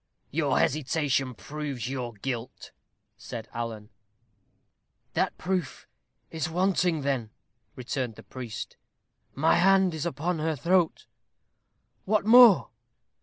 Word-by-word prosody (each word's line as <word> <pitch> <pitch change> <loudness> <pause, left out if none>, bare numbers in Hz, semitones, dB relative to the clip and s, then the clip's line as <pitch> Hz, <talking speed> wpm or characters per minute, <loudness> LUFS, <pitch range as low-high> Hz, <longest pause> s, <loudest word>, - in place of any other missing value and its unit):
"Your - - +1
hesitation 135 -2 0
proves 145 -4 -5
your 125 -3 -4
guilt," 120 +2 -6 0.5
said 115 -1 -8
Alan. 115 -2 -5 1.2
"That - - 0
proof 180 -5 -3 0.5
is 160 -1 -3
wanting, 180 -2 +1
then?" 135 -5 -1 0.5
returned 125 -2 -4
the - - -13
priest; 120 -4 -7 0.6
"my 155 +4 +3
hand 190 0 +4
is 160 +1 -3
upon 170 +1 -2
her 160 0 -1
throat 170 +3 +1 1.0
what 210 0 +1
more?" 235 -4 +8
150 Hz, 105 wpm, -27 LUFS, 125-175 Hz, 1.2 s, more